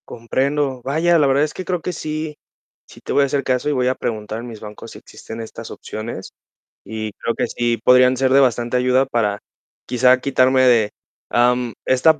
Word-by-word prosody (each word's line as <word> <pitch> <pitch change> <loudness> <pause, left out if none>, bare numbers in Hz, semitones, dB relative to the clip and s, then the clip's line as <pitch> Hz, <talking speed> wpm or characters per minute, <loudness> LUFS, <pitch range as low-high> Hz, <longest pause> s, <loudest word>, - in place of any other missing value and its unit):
Comprendo. 135 +3 -1
Vaya, 165 +5 +2
la 145 - +4
verdad 135 +2 +3
es 150 - -2
que 185 - -6
creo 180 -2 -2
que 180 - -4
sí, 155 -1 -5 0.5
sí - - -16
te - - -4
voy 140 - +4
a - - +3
hacer 140 +1 -1
caso 130 +2 0
y - - +1
voy 125 -3 +1
a 130 - +1
preguntar 110 -2 -4
en 120 - -7
mis 115 -3 -9
bancos 105 0 -10
si - - -11
existen 115 - -10
estas 110 - -9
opciones 110 +2 -7 0.5
y 110 +1 -5
creo 115 - -3
que - - -1
sí 120 -1 -1
podrían 125 0 +5
ser 130 0 +1
de 135 - +6
bastante 120 -2 +2
ayuda 125 +1 +3
para 110 -6 -1 0.5
quizá 125 +1 +4
quitarme 130 -1 +3
de, 115 -5 +4 0.4
am, 125 -1 +2
esta 155 +4 +4
125 Hz, 200 wpm, -20 LUFS, 115-140 Hz, 0.5 s, de